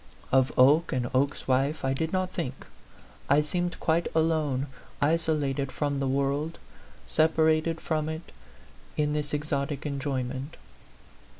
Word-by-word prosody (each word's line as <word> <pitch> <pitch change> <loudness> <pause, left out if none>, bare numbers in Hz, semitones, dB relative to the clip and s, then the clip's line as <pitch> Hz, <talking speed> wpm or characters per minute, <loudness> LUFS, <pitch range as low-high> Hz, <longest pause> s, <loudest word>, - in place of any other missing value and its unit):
Of 130 0 +4
Oke 145 +6 +5
and 125 -1 -1
Oke's 140 +2 0
wife 135 +3 +1
I 135 - +2
did 160 +4 -2
not 185 -1 0
think; 135 -8 -4 0.6
I 145 +1 +6
seemed 175 +3 -2
quite 165 +1 +1
alone, 155 -5 +1 0.3
isolated 145 -3 +1
from 145 -2 -1
the 135 - 0
world, 140 +4 0 0.5
separated 160 +1 +2
from 155 -1 -1
it 160 +1 -6 0.7
in 150 0 +1
this 150 -1 -2
exotic 145 -1 -2
enjoyment. 135 0 -3
150 Hz, 125 wpm, -28 LUFS, 135-160 Hz, 0.7 s, I